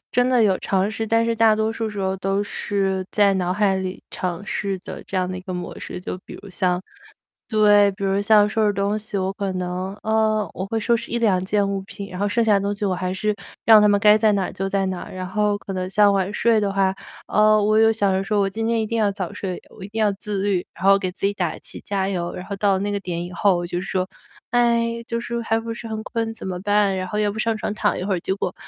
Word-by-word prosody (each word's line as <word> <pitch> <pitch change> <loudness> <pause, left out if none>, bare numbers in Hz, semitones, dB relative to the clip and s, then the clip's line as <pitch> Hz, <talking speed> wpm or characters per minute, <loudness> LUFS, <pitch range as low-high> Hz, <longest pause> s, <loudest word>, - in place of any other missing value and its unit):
真 245 0 +3
的 250 -2 +4
有 195 -3 +3
尝 195 +1 0
试。 225 +1 -3
但 230 +1 +2
是 230 0 0
大 225 -1 +4
多 220 +1 0
数 225 0 -3
时 210 -1 -7
候 190 -1 0
都 195 +1 0
是 195 -2 -1
在 205 -2 +4
脑 180 -2 -1
海 200 -1 +2
里 190 0 -4
尝 180 +1 -4
试 200 -2 -2
的 - - -7
这 195 - -4
样 185 0 0
的 185 - -4
一 - - -8
个 185 0 -6
模 180 0 -6
式， - - -6
就 180 0 -5
比 - - -9
如 200 - -11
像 180 -1 0 0.7
对， 205 -2 +5
比 200 +1 -8
如 195 +1 +1
像 210 0 +5
收 220 0 +1
拾 205 - +1
东 200 +2 0
西， 210 -1 -5
我 190 0 -1
可 195 -1 -3
能， 185 +1 -3
呃， 220 -1 +1
我 190 - -4
会 225 +3 -2
收 230 +2 +2
拾 230 - -8
1-2 215 -6 +2
件 200 +1 +1
物 195 -1 -2
品， 200 0 -8
然 180 - -7
后 205 - +1
剩 230 +3 +1
下 215 -2 +4
的 - - +3
东 200 +1 -2
西 205 - -6
我 195 -2 +1
还 185 0 -2
是 210 +3 0 0.3
让 220 -2 +8
它 210 - +5
们 205 0 +4
该 210 0 +7
在 215 -1 +3
哪 195 -2 -1
就 190 +1 -3
在 195 0 0
哪。 185 -1 -5
然 185 0 -5
后 205 +2 0
可 205 - -8
能 185 -1 -3
像 205 +1 +5
晚 195 0 0
睡 230 0 +3
的 200 -2 -1
话， 195 -1 +2 0.3
呃， 215 0 +4
我 215 +1 +3
又 225 0 +6
想 200 -3 +1
说 205 +1 0
我 195 - +1
今 225 +3 -3
天 230 0 +1
一 - - -1
定 230 +2 -2
要 215 -2 +3
早 190 -3 -4
睡， 185 -2 -5
我 - - -16
一 - - -6
定 220 +2 -3
要 210 -1 +3
自 200 0 -4
律， 195 -3 0
然 170 - -11
后 195 0 +6
给 185 -2 -2
自 185 - -4
己 200 - +3
打 180 -5 -2
气 - - -9
加 195 -1 -1
油。 175 -3 -3
然 180 - -6
后 200 - -6
到 195 -1 +2
那 205 +1 -2
个 200 - -1
点 175 -3 -4
以 175 - -7
后 180 -2 +2
就 175 0 -3
是 185 - -5
说， 185 0 -1 0.4
哎， 235 -1 +1
就 230 -1 -2
是 235 0 -3
还 225 0 +1
不 230 0 -6
是 230 0 -6
很 220 -1 -4
困 225 -1 -3
怎 225 - -7
么 180 -1 -3
办？ 205 -1 +2
然 185 0 -3
后 210 - -2
要 210 -1 +1
不 210 - -8
上 225 +1 0
床 210 - -3
躺 - - +1
一 - - -3
会 195 0 0
儿， - - -2
结 190 - -1
果 190 -2 -3
200 Hz, 295 characters per minute, -22 LUFS, 190-215 Hz, 0.7 s, 让